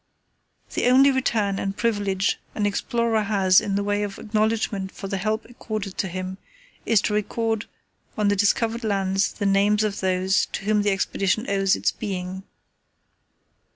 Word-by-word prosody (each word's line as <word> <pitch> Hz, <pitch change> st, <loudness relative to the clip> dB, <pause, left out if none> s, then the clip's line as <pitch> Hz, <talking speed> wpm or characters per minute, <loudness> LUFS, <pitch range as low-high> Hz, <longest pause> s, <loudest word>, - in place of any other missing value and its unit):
The -, -, +1 dB
only 270 Hz, +2 st, +6 dB
return 215 Hz, -7 st, 0 dB
and 195 Hz, 0 st, -3 dB
privilege 205 Hz, -4 st, 0 dB, 0.2 s
an 210 Hz, -, 0 dB
explorer 230 Hz, +2 st, 0 dB
has 195 Hz, -3 st, +4 dB
in 195 Hz, -, -2 dB
the 200 Hz, -, 0 dB
way 205 Hz, 0 st, 0 dB
of 205 Hz, -1 st, -4 dB
acknowledgment 215 Hz, -3 st, -1 dB
for 195 Hz, -, -7 dB
the 195 Hz, -, -2 dB
help 215 Hz, +3 st, -1 dB
accorded 215 Hz, -4 st, -4 dB
him 185 Hz, 0 st, -5 dB, 0.5 s
is 225 Hz, -3 st, +4 dB
to 210 Hz, -, -1 dB
record 225 Hz, +1 st, -1 dB, 0.5 s
on 210 Hz, -1 st, +2 dB
the 205 Hz, -, +3 dB
discovered 225 Hz, +4 st, +1 dB
lands 195 Hz, -2 st, +1 dB
the 205 Hz, -, -4 dB
names 200 Hz, +2 st, +3 dB
of 210 Hz, -2 st, -2 dB
those 185 Hz, +1 st, +1 dB
to -, -, -4 dB
whom 210 Hz, 0 st, +2 dB
the 205 Hz, -, +1 dB
Expedition 195 Hz, +3 st, 0 dB
owes 195 Hz, -1 st, +2 dB
its -, -, +1 dB
being. 190 Hz, -3 st, -5 dB
205 Hz, 155 wpm, -24 LUFS, 195-220 Hz, 0.5 s, only